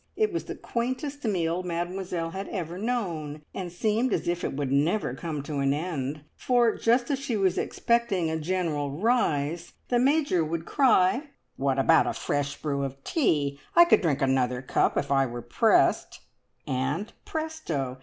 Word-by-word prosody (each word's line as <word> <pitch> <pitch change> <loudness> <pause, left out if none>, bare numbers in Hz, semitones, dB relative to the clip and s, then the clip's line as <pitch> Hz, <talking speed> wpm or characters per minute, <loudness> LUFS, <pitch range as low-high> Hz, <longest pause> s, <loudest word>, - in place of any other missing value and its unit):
It 430 -3 +1
was 340 - -2
the - - -6
quaintest 260 +4 -3
meal 175 -4 0
Mademoiselle 175 -1 -3
had 195 +2 -5
ever 175 -2 -4
known, 170 -11 -3
and 180 -3 -5
seemed 220 +7 0
as - - -1
if 175 0 -1
it - - -2
would 140 -2 -2
never 150 - +1
come 150 +1 -4
to 145 -1 -4
an 140 0 +2
end, 150 -3 -3
for 240 -3 +2
just 240 +3 +2
as 275 - 0
she 250 -5 -2
was 190 -2 +2
expecting 235 -8 0
a 160 0 -1
general 160 -4 -1
rise 170 - 0 0.2
the 245 - +3
Major 275 - +2
would 165 +1 -3
cry, 255 - +3 0.3
"What 135 -1 0
about 160 +4 +4
a - - 0
fresh 145 0 -2
brew 140 -2 -2
of 135 0 -6
tea? 145 - +1 0.2
I 345 0 +9
could 345 - +4
drink 150 -7 +1
another 130 -1 +1
cup - - +1
if 140 - -1
I 135 -1 +3
were 120 -1 -6
pressed," 120 - +2 0.4
and 145 +10 -2
presto! 175 - -4
170 Hz, 170 wpm, -27 LUFS, 145-235 Hz, 0.4 s, I